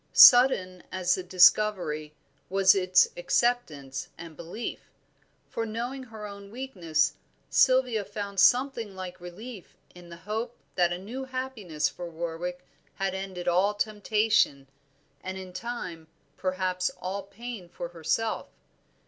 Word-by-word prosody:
Sudden 195 -8 +7
as 185 -1 +1
the 185 - -1
discovery 180 -4 +3 0.3
was 190 0 +5
its 185 -1 +4
acceptance 160 - 0
and 165 -1 -10
belief; 170 +9 -6 0.6
for, 230 - -3
knowing 235 +4 -4
her 220 -3 -9
own 200 -1 -9
weakness, 185 - 0 0.4
Sylvia 255 -5 +4
found 200 -1 -5
something 245 -3 +3
like 185 -1 -7
relief 195 +4 -10 0.2
in 175 -1 -14
the 170 - -9
hope 220 +7 -4 0.2
that 175 -2 +2
a 175 - -1
new 235 +8 -6
happiness 255 -12 -2
for 175 -1 -7
Warwick 170 +2 -5 0.3
had 195 -1 -1
ended 190 -2 -5
all 185 +4 +3
temptation, 210 -8 +1 0.6
and 190 0 -5
in 185 -1 -9
time 180 -6 -6 0.3
perhaps 185 -1 -1
all 190 +2 -3
pain 210 -2 -9
for 170 - -6
herself. 170 +7 -1
190 Hz, 125 wpm, -28 LUFS, 175-225 Hz, 0.6 s, Sudden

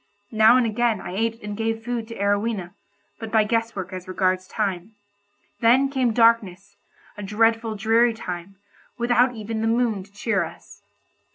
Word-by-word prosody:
Now 220 +2 +6
and 250 - +2
again, 225 -1 0
I - - -7
ate 225 +3 -1
and 210 -1 -5
gave 225 +1 -2
food 240 -2 -3
to 230 - -8
Arowhena, 200 -2 -1 0.5
but 225 -1 -7
by 220 -1 +4
guess 230 +1 -1
work 190 -2 -6
as 185 0 -7
regards 185 0 0
time. 200 0 -3 0.6
Then 255 +4 +4
came 260 -4 +1
darkness, 205 -4 +2 0.4
a - - -6
dreadful 225 +2 +1
dreary 225 +3 +2
time, 180 -2 -7 0.4
without 245 +1 +2
even 220 0 -4
the 225 - 0
moon 225 -3 +1
to 195 +2 -15
cheer 200 -2 -1
us. 165 - -12
220 Hz, 165 wpm, -23 LUFS, 200-230 Hz, 0.6 s, Now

